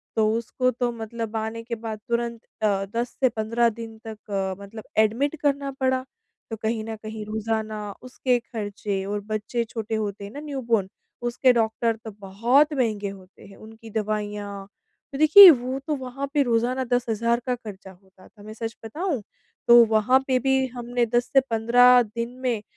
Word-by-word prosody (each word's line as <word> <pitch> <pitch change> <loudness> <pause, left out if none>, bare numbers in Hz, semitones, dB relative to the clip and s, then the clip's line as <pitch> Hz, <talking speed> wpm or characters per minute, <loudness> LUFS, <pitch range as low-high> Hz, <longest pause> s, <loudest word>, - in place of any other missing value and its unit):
तो 215 -1 +3
उसको 255 +2 -1
तो 245 0 -1
मतलब 225 -1 -6
आने 220 +1 -4
के 235 0 -4
बाद 220 -1 -6
तुरंत 235 -1 -1 0.2
अ, 200 -2 +1
10 235 +1 -1
से 260 -2 +4
15 230 +2 +1
दिन 225 0 -9
तक 215 -1 -10
अ, 190 -1 -1
मतलब 215 +2 -10
एडमिट 230 +8 +2
करना 280 -1 0
पड़ा, 260 0 +1 0.5
तो 225 - -2
कहीं 220 0 -1
न 225 0 -5
कहीं 215 0 -7
रोज़ाना 215 -1 -3
उसके 255 0 0
खर्चे 205 -4 -4
और 205 +1 -2
बच्चे 215 +2 -2
छोटे 225 -1 -4
होते 205 -2 -3
हैं 200 - -8
ना 285 - -8
न्यूबॉर्न 240 -9 -1 0.4
उसके 250 +2 +3
डॉक्टर 225 0 +1
तो 220 - -6
बहुत 235 +10 +2
महँगे 215 -6 -1
होते 190 -1 -14
हैं। 195 - -14
उनकी 225 +1 -13
दवाइयाँ, 205 -2 -4 0.4
तो 275 - -5
देखिए, 330 +6 +10
वो 260 -1 -2
तो 300 - 0
वहाँ 265 +1 -5
पे 295 - +3
रोज़ाना 245 +2 0
10,000 235 -1 +1
का 250 -1 0
खर्चा 200 -5 -10
होता 190 0 -20
था 205 -2 -18
मैं 215 - -9
सच 225 +1 -5
बताऊँ? 300 - -3 0.5
तो 240 0 +9
वहाँ 220 +4 +3
पे 260 -1 +2
भी 265 +1 +2
हमने 245 0 -1
10 240 +2 +1
से 270 - +8
15 245 +2 +5
दिन 230 +2 -5
में 235 -4 0
230 Hz, 175 wpm, -24 LUFS, 215-250 Hz, 0.5 s, देखिए